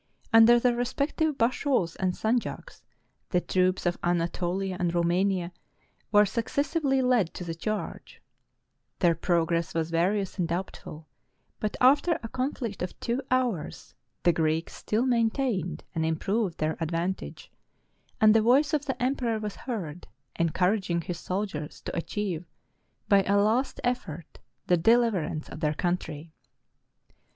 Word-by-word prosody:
Under 225 +1 +8
their 245 0 +2
respective 280 +5 -1
bashaws 245 - +1
and 185 -1 0
sanjaks, 225 +5 -2 0.5
the 180 - +2
troops 185 +1 +1
of 175 0 0
Anatolia 175 +2 -1
and 175 -1 0
Romania 175 +1 +1 0.6
were 210 0 +6
successively 270 - 0
led 245 -9 +2
to - - -5
the 170 -1 -4
charge: 210 +6 -5 0.8
their 175 -3 +4
progress 170 0 0
was 165 0 -1
various 190 +4 0
and 175 - +1
doubtful; 165 -3 -5 0.5
but, 215 - -2
after 285 +6 +4
a 225 - -5
conflict 255 -5 -3
of 180 - -5
two 240 +3 -1
hours, 245 -11 -1 0.3
the 175 - +4
Greeks 160 0 0
still 220 +4 -1
main 235 -3 +3
tained 235 - -2
and 160 -2 -1
improved 175 +4 -1
their 155 +1 -1
advantage; 170 +3 -3 0.7
and 215 0 +6
the 225 - +5
voice 270 +7 +3
of 295 -2 +1
the 265 - -3
emperor 250 -3 0
was 210 -2 -5
heard, 180 - -6 0.3
encouraging 180 +1 +1
his 170 +1 -5
soldiers 185 -6 -4
to - - -6
achieve, 180 -1 -3 0.6
by 200 -1 +5
a 200 - +3
last 220 +6 +1
effort, 180 -11 -3 0.3
the 180 - +3
deliverance 205 -6 +2
of - - -9
their 150 -2 0
country. 165 -3 -3
195 Hz, 135 wpm, -27 LUFS, 170-235 Hz, 0.8 s, Under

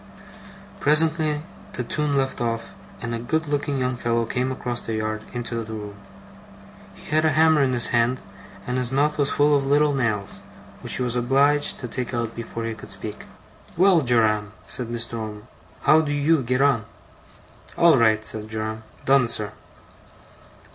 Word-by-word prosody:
Presently 155 0 +3 0.3
the 125 - -3
tune 145 +3 -1
left 135 -2 -1
off, 115 -4 -2 0.3
and 115 0 -3
a 115 - -2
good 160 +7 -1
looking 145 -1 -1
young 125 -1 -1
fellow 115 -1 0
came 125 +3 -1
across 120 -2 -3
the 115 - -4
yard 110 0 -2
into 115 -1 -3
the 110 0 -8
room. 105 -1 -6 1.0
He - - -13
had 155 +1 +3
a 155 -2 +3
hammer 160 0 +4
in 130 -2 +2
his 120 -2 +2
hand, 120 +1 +2 0.5
and 125 +1 -1
his 125 -1 0
mouth 150 +3 +1
was 140 -1 +2
full 145 0 +3
of 140 - +1
little 145 +1 +3
nails, 105 -7 -1 0.4
which - - 0
he 130 - -1
was 125 -1 -1
obliged 140 +4 +2
to 125 - -4
take 125 +1 -4
out 115 -1 -2
before 115 0 -5
he 115 - -2
could 110 - -11
speak. - - -7 0.5
'Well, 185 -2 +5
Joram!' 110 -5 +2
said 125 - -6
Mr. 115 0 -2
Omer. 105 -1 -6 0.4
'How 155 +1 +6
do 145 -2 -2
you 145 +1 +3
get 125 +2 +1
on?' 130 -7 +2 0.9
'All 170 -2 +6
right,' 110 -3 +3
said 110 0 0
Joram. 110 0 -4 0.2
'Done, 135 -2 +4
sir. 105 -3 -2
125 Hz, 175 wpm, -23 LUFS, 115-145 Hz, 1.0 s, How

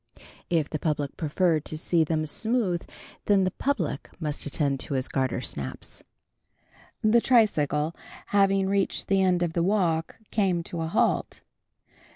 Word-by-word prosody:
If 160 -4 +1
the 155 - -4
public 150 -3 -2
preferred 160 0 +1
to 155 - -3
see 165 +1 +2
them 155 0 -1
smooth 210 +1 -1 0.4
then 200 -2 +4
the 185 - +1
public 185 - -2
must 150 -3 -3
attend 140 -2 0
to 140 - -4
his 130 -1 -1
gartersnaps. 120 - -3 1.0
The 225 +2 +5
tricycle 160 - +2 0.3
having 195 -1 +3
reached 195 0 0
the 195 -1 +3
end 180 -2 +2
of 170 -2 -1
the 170 - +1
walk, 170 -4 +1 0.2
came 185 -5 +1
to 170 0 -5
a 160 - -1
halt. 160 - 0
170 Hz, 145 wpm, -26 LUFS, 150-195 Hz, 1.0 s, The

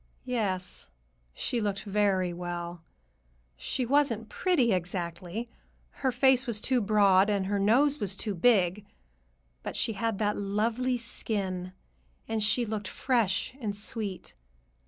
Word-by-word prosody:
Yes, 200 -7 -2 0.4
she 235 - -2
looked 200 -2 -2
very 195 -3 +1
well. 175 -1 -5 0.7
She 245 - -2
wasn't 240 -5 +1
pretty, 310 -11 +2
exactly,—her 180 - -4
face 265 0 +4
was 225 -3 0
too 255 +2 +1
broad 200 -2 +4
and 200 -2 +1
her 200 +1 0
nose 270 +9 +4
was 195 -3 -1
too 210 -1 -2
big. 190 -1 +3 0.8
But - - -5
she 225 - +2
had 225 +1 -1
that 210 0 0
lovely 225 +5 0
skin, 195 -6 -3 0.5
and 225 -1 -1
she 220 +3 +3
looked 210 -2 -4
fresh 230 -4 0
and 205 -3 -2
sweet. 205 -2 -4
210 Hz, 125 wpm, -29 LUFS, 190-235 Hz, 0.8 s, face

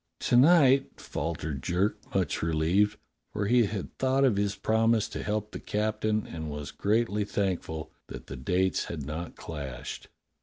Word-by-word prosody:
"To - - +2
night?" 135 -1 +5
faltered 75 -2 -4
Jerk 90 +9 0 0.2
much - - 0
relieved, 85 +6 +2 0.3
for 100 - -2
he 120 +2 +4
had 100 -2 -5
thought 135 +1 +3
of 125 -6 +3
his 100 0 0
promise 110 0 +2
to - - -5
help 105 0 -2
the - - -6
captain, 110 0 -1
and 80 -1 -6
was 75 -2 -5
greatly 105 0 +1
thankful 90 -6 -2 0.2
that - - -8
the 65 - -7
dates 90 +9 0
had 75 -5 -5
not 80 +3 -5
clashed. 70 -6 -7
100 Hz, 155 wpm, -28 LUFS, 80-110 Hz, 0.3 s, night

